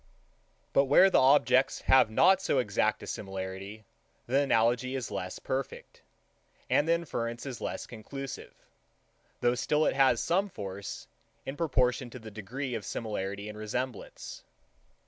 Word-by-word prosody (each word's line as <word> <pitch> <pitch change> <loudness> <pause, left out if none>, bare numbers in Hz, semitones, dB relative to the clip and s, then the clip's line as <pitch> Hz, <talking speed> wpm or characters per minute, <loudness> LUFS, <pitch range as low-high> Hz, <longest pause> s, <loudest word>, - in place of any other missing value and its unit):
But 140 - +5
where 180 +8 +6
the - - +5
objects 130 -1 +4
have 130 -4 +5
not 190 +12 +5
so 165 - +1
exact 110 -3 +1
a - - -6
similarity, 95 +2 -6 0.4
the 130 +3 +2
analogy 125 -1 +2
is 125 -5 -4
less 90 0 -4
perfect, 135 0 -5 0.7
and 145 - +3
the 165 - +4
inference 120 -8 -3
is 130 -3 -6
less - - -4
conclusive; 135 +4 -8 0.9
though 120 - +3
still 150 +5 +1
it - - +2
has 135 -1 +4
some 195 +4 +1
force, 100 - -7 0.4
in 135 - -4
proportion 130 -5 +1
to 125 - -9
the 110 -3 -10
degree 125 +6 -5
of 110 -3 -3
similarity 100 -1 -4
and 105 0 -8
resemblance. 110 +2 -5
125 Hz, 145 wpm, -30 LUFS, 105-135 Hz, 0.9 s, where